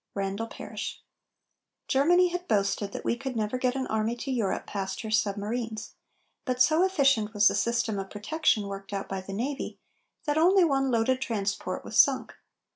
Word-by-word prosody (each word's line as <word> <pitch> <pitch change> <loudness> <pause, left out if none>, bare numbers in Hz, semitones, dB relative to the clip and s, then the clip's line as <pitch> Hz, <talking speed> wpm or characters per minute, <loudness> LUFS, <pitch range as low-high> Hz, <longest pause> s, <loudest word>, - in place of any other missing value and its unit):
RANDALL 200 +3 -2
PARRISH. - - -7 0.8
Germany 350 +7 +4
had 355 +1 -4
boasted 200 - 0
that - - -7
we - - +1
could 265 +1 -5
never 220 +3 -1
get 255 0 +1
an 265 -1 -1
army 220 +1 -1
to 265 +3 -5
Europe 220 -7 -1
past 190 -1 -4
her 220 - -5
submarines, 215 +2 -1 0.5
but 255 -2 -2
so 315 +6 +5
efficient 275 - +2
was 205 0 +6
the - - -2
system 220 0 0
of 195 0 -5
protection 215 0 0
worked 195 0 -7
out 195 0 -3
by 195 -1 -4
the 190 - -9
navy, 265 +8 -3 0.5
that 295 0 +1
only 370 +3 +5
one 270 -4 +2
loaded 255 +2 +1
transport 205 -5 -2
was - - -1
sunk. - - +4
230 Hz, 175 wpm, -28 LUFS, 205-270 Hz, 0.8 s, was